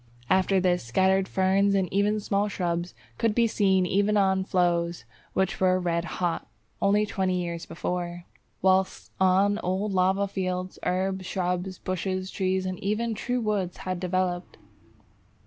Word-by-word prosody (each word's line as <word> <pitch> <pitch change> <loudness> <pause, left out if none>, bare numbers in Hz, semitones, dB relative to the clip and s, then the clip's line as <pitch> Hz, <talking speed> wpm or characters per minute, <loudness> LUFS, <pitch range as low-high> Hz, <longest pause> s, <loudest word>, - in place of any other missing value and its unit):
After 190 +1 +3
this, 180 -3 +1
scattered 190 +10 +2
ferns 195 +1 +2
and 190 -2 +2
even 205 +2 +2
small 205 0 0
shrubs 175 -3 -2 0.2
could 225 -2 +1
be 235 - +4
seen 190 -4 +2
even 200 +3 +2
on 190 -1 +3
flows 175 - 0 0.3
which 190 -1 0
were 185 0 +3
red 170 -1 -1
hot 175 -2 -1 0.3
only 205 +2 +3
twenty 185 -3 -1
years 170 -1 -4
before, 175 +1 -4 0.4
whilst 190 0 +2
on 195 +2 +3
old 195 +2 -1
lava 190 +2 +2
fields 185 -1 -3
herbs, 185 +1 -1
shrubs, 180 0 -2
bushes, 185 +1 -3
trees, 190 -1 0
and 185 -1 -3
even 215 +3 -1
true 245 +3 -2
woods 205 -5 -1
had 185 -1 -2
developed. 180 0 -2
190 Hz, 145 wpm, -26 LUFS, 180-200 Hz, 0.4 s, be